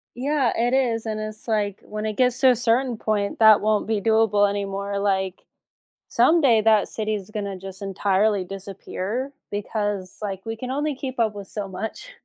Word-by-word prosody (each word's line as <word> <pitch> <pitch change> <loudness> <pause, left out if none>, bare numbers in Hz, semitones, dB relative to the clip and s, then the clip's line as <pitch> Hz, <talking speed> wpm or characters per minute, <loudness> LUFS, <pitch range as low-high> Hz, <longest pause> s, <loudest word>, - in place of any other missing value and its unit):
Yeah, 275 0 +1
it 240 +2 +1
is, 235 -4 +1
and 215 -1 -3
it's 215 +1 -7
like, 205 -3 0
when 215 0 -5
it 215 - -1
gets 250 -1 +2
to 265 - +6
a 250 - +5
certain 240 +1 +1
point, 210 -1 -1
that 220 -1 +7
won't 215 0 +1
be 215 -2 0
doable 220 -2 +3
anymore, 200 0 -3
like, 190 -2 -1 0.6
someday 275 -9 +4
that 215 -2 +4
city 215 -1 -2
is 200 -1 -6
gonna 200 -3 -4
just 190 +1 -9
entirely 195 +1 +1
disappear 195 +6 -5 0.2
because, 205 -2 -3
like, 195 -2 -4
we 225 - -3
can 250 +3 -6
only 290 +2 -1
keep 260 -1 -6
up 220 -2 +1
with 200 -2 -8
so 205 -2 -4
much. 215 - -6
215 Hz, 180 wpm, -23 LUFS, 200-230 Hz, 0.6 s, that